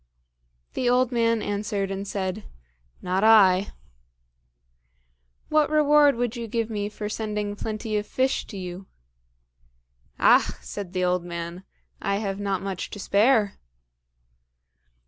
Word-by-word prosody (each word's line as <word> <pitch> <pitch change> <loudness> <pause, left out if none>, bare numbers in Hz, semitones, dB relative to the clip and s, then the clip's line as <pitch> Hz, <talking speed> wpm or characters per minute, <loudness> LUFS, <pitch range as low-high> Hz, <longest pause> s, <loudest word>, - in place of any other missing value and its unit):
The 245 - 0
old 250 0 +3
man 230 -2 +1
answered 205 -1 -2
and 195 +1 -4
said, 195 +1 -3 0.6
"Not 185 +2 0
I." 200 -3 +5 1.8
"What 305 -1 +3
reward 295 -2 +5
would 240 0 -2
you 235 -1 -5
give 230 +1 -2
me 205 -1 -2
for 210 0 -6
sending 210 -1 -3
plenty 215 +1 -4
of 210 - -3
fish 260 +1 0
to 205 - -8
you?" 185 0 -7 1.3
"Ach!" - - +5
said 195 -3 -7
the 185 -1 0
old 180 -1 +1
man, 170 +1 -6 0.4
"I 200 -1 0
have 200 -1 -3
not 195 -2 -2
much 195 -2 -4
to 205 - -8
spare." 210 +1 +2
205 Hz, 125 wpm, -25 LUFS, 195-230 Hz, 1.8 s, I